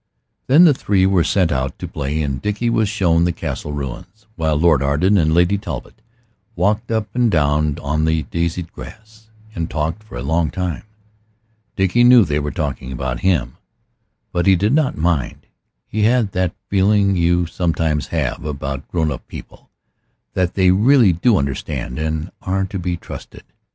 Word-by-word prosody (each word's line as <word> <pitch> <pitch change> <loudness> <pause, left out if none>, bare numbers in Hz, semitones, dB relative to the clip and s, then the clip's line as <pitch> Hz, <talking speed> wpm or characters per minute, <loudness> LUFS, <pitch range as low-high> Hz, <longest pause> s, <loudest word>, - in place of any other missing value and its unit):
Then 150 +7 +7
the 155 - +6
three 100 -7 +1
were 95 -3 +3
sent 90 -2 +1
out 65 -2 -2
to - - -6
play, 75 +2 -3
and 70 -2 -3
Dickie 105 +3 -1
was 110 -3 +1
shown 90 -6 +2
the 90 - +2
castle 75 - -5
ruins, 75 - -7
while 80 -2 0
Lord 80 -3 +3
Arden 75 +9 +2
and 80 -5 +3
Lady 90 +4 +3
Talbot 110 - -7 0.5
walked 105 +5 0
up 110 -2 -1
and 120 -1 +2
down 75 -3 +1
on 75 +2 0
the 80 -1 +1
daisied 85 +4 -3
grass, 110 0 -13 0.2
and 85 -3 -3
talked 80 +6 -2
for 110 -12 -10
a - - -5
long 80 +2 0
time. 90 -3 -3 0.9
Dickie 95 +5 +2
knew 120 -3 +7
they 75 -2 -1
were 75 0 -3
talking 70 -2 -4
about 65 -1 -3
him, 70 -10 0 0.7
but 85 +2 0
he 95 - +6
did 105 +7 +1
not 150 -3 +1
mind. 80 -5 -1 0.4
He 110 - -3
had 115 -1 +2
that 90 -1 -1
feeling 100 0 +2
you 85 0 +2
sometimes 80 -3 -1
have - - -2
about 70 -2 -5
grown 80 -3 -1
up 65 - -7
people, - - -12 0.6
that 90 -1 -1
they 95 -2 +4
really 110 +1 +5
do 100 +6 +2
understand, 70 -2 -3
and 80 +2 -3
are 95 +1 -1
to 95 0 -5
be 90 0 -2
trusted. - - -10
85 Hz, 170 wpm, -19 LUFS, 75-100 Hz, 0.9 s, Then